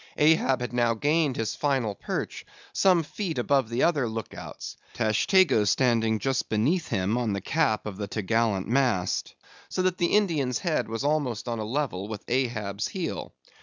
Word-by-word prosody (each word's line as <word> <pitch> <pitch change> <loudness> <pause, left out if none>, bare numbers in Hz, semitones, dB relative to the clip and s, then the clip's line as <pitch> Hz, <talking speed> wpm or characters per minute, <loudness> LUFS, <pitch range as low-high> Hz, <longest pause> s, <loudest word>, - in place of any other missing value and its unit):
Ahab 150 -4 +3
had 125 0 -4
now 120 -1 +2
gained 145 +2 +1
his 115 - -2
final 135 -7 0
perch, - - -4 0.3
some 180 -4 +4
feet 170 0 -4
above 130 -1 +1
the 120 +2 0
other 145 -8 +2
look 110 -1 -5
outs, - - -8 0.2
Tashtego 115 - +3
standing 115 -1 +2
just 135 +3 -1
beneath 140 +12 +1
him 100 +6 0
on 115 -4 -1
the 100 - -2
cap 110 - 0
of 105 -3 -6
the 100 -1 -4
top 105 0 -4
gallant 110 -3 +1
mast, 120 -7 0 0.3
so 185 - -1
that 185 0 0
the 175 +2 +2
Indian's 150 - +1
head 160 - -1
was 115 +3 -3
almost 145 -7 -1
on 115 -1 -2
a 110 - -3
level 110 -6 -2
with 110 -2 -7
Ahab's 110 -5 -1
heel. 185 -3 -5
120 Hz, 175 wpm, -26 LUFS, 110-150 Hz, 0.3 s, some